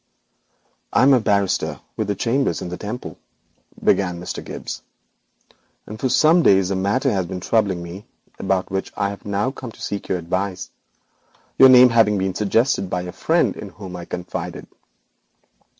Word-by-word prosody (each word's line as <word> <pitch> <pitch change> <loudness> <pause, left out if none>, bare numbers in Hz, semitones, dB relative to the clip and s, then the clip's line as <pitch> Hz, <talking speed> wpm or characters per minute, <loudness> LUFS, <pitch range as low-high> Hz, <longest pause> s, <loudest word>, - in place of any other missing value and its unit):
'I - - +4
am 135 +1 +6
a 130 - +5
barrister 100 -3 0 0.2
with 105 -3 -2
chambers 130 +6 0
in 90 - -5
the 90 - -4
Temple,' 110 +4 -7 0.6
began 90 -3 +2
Mr. 90 - -6
Gibbes, - - -7 1.0
'and 105 +1 -9
for 130 - 0
some 160 +6 +5
days 95 - +4
a - - 0
matter 100 +2 +1
has 95 -3 -1
been 95 0 -5
troubling 95 -3 0
me 90 +4 -9 0.3
about 95 -1 -1
which 95 0 -3
I 100 - 0
have 100 - -9
now 105 +5 -1
come 130 -3 -8
to - - -18
seek 100 -1 -5
your 95 - 0
advice, 95 +2 -3 0.9
your 135 - +9
name 125 0 +8
having 110 -3 +3
been 95 0 -1
suggested 105 0 +1
by 90 0 -2
a 90 - -6
friend - - +1
in - - -8
whom 95 -3 -9
I 85 -1 -7
confided.' 90 0 -6
100 Hz, 165 wpm, -21 LUFS, 95-115 Hz, 1.0 s, your